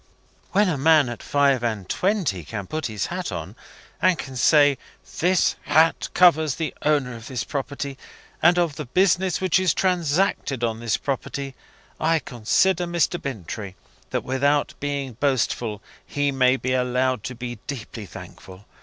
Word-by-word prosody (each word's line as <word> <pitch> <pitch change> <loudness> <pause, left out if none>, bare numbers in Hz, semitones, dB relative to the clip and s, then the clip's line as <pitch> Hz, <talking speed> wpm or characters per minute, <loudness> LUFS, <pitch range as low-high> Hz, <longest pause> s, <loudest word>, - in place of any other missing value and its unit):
"When 205 +1 +3
a 155 -6 -1
man 155 -2 +5
at 120 - -7
five 140 -3 +2
and 110 -6 -2
twenty 180 - 0
can 100 +6 -6
put 155 +7 -3
his 105 -3 -3
hat - - -3
on, - - -6 0.5
and 185 -2 +4
can 135 -3 -7
say 145 +2 +4 0.4
'this 180 +1 +2
hat 160 +3 +3
covers 160 -5 +5
the 160 -3 -3
owner 140 -5 +1
of 115 -1 -10
this 125 -3 -3
property 140 -1 -5 0.4
and 175 +2 +5
of 170 -4 +1
the 150 - -4
business 185 +3 +2
which 185 -1 +2
is 185 -4 +2
transacted 170 -7 0
on 115 -1 -1
this 115 -1 0
property,' 140 0 -4 0.5
I 165 +1 +2
consider, 160 - +1
Mr. 170 0 0
Bintrey, 105 -5 -6 0.3
that, - - -2
without 140 +3 +1
being 140 -4 -3
boastful, 120 -5 0 0.2
he 145 0 -1
may 130 -1 +3
be 130 -1 -2
allowed 125 -1 0
to 125 - -5
be 120 -1 -6
deeply 115 -6 -6
thankful. 95 +3 -12
140 Hz, 155 wpm, -23 LUFS, 120-160 Hz, 0.5 s, man